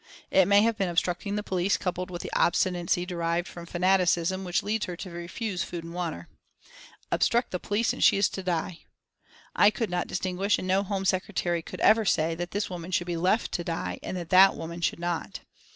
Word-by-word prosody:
It 190 -2 +5
may 200 +1 +6
have 230 -1 +1
been 190 -2 +1
obstructing 180 +3 -1
the 210 - -2
police, 190 0 0
coupled 180 -1 -3
with 175 -2 -6
the - - -7
obstinacy 175 0 +1
derived 170 0 -1
from 170 -1 -10
fanaticism 185 0 +2
which 180 -1 -1
leads 210 0 -1
her 175 -1 -6
to 185 0 -7
refuse 175 +3 -4
food 170 -2 -6
and 165 0 -9
water. 170 - -4 0.8
Obstructing 240 +1 +2
the 180 - -2
police 210 +5 0
and - - -2
she - - +6
is 200 - +4
to 190 - -5
die! 175 -1 -2 0.8
I 205 - +6
could 215 -1 -3
not 175 0 -1
distinguish, 190 +2 0
and 185 - -5
no 190 +1 +3
Home 195 -1 -3
Secretary 185 -2 0
could - - -9
ever 220 +1 +5
say, 165 -4 +1
that 175 +2 -4
this 205 +2 -2
woman 175 -1 -7
should 175 -1 0
be 175 -1 -3
left 185 +7 +1
to 175 - -2
die 165 - -3
and 185 - -5
that 170 -2 -6
that 190 +1 +7
woman 170 +1 -7
should 170 - 0
not. 175 -1 -3
180 Hz, 210 wpm, -27 LUFS, 170-195 Hz, 0.8 s, that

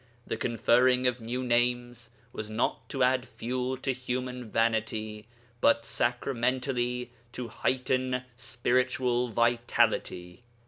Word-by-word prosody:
The - - -2
conferring 125 +2 +3
of 125 -1 +1
new 120 +3 -3
names 120 -1 0 0.2
was 110 0 -5
not 115 0 -1
to 135 -2 0
add 130 0 +3
fuel 125 +2 -3
to 130 +1 -1
human 125 -1 -4
vanity, 110 -1 -1 0.3
but 115 0 +4
sacramentally 125 0 -1 0.2
to 125 -2 -5
heighten 130 +1 0
spiritual 125 +1 0
vitality. 115 -5 +1
120 Hz, 105 wpm, -29 LUFS, 115-125 Hz, 0.3 s, but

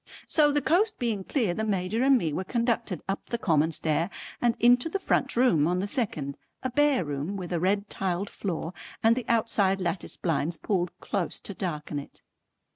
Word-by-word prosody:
So 295 -2 +4
the 290 -1 +1
coast 405 +9 +2
being 225 -5 -1
clear, 220 -5 0
the 220 - -2
Major 205 +2 0
and 270 0 +6
me 165 -9 -1
were 185 - -2
conducted 230 -3 -1
up 195 +1 -3
the 235 - -2
common 160 -8 +2
stair 160 +2 0 0.3
and 235 -1 +2
into 245 +5 +5
the 395 - -1
front 385 - +1
room 205 - +4
on 180 +1 +1
the 185 - 0
second, 160 - -2 0.2
a 260 - -1
bare 285 - +3
room 145 +7 -3
with 180 -2 -5
a 170 - +1
red 200 +4 +1
tiled 190 0 -2
floor 175 -3 -4 0.3
and 225 +1 +5
the 255 - -3
outside 210 -4 +2
lattice 180 0 -2
blinds 165 0 0
pulled 180 0 0
close 195 -4 -2
to 200 - -7
darken 150 -6 -3
it. 140 - -13
195 Hz, 195 wpm, -27 LUFS, 170-235 Hz, 0.3 s, and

